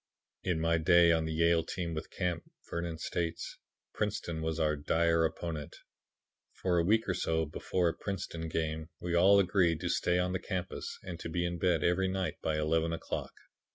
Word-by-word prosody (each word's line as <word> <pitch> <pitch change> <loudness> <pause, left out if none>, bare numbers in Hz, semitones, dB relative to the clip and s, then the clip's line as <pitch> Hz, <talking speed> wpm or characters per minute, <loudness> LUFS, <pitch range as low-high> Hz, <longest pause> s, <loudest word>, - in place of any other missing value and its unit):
"In 90 -3 0
my 80 0 +2
day 85 +1 +6
on 80 -1 +2
the 80 - -2
Yale 85 +1 +3
team 85 -1 -4
with 80 0 -5
Camp," 90 -2 -3 0.2
Vernon 85 -1 -3
states, 85 0 -3 0.3
"Princeton 80 -2 -2
was 80 0 -2
our 75 -1 +2
dire 80 +3 +2
opponent. 80 -2 -4 0.8
For 90 -2 +1
a - - +3
week 110 +5 +3
or 95 - +1
so 80 -2 0
before 85 +3 0
a - - -2
Princeton 85 -4 -4
game, 80 0 -2
we 90 -1 -3
all 95 +4 +6
agreed 90 -4 +3
to - - -1
stay 90 - +2
on 90 0 +1
the 95 - 0
campus 95 -2 -4
and 85 -2 -6
to - - -5
be 85 +1 -1
in 85 0 -3
bed 85 -3 +2
every 90 +2 +2
night 95 0 -2
by 80 -1 0
eleven 80 +2 +1
o'clock. 85 - -4
85 Hz, 190 wpm, -32 LUFS, 80-90 Hz, 0.8 s, day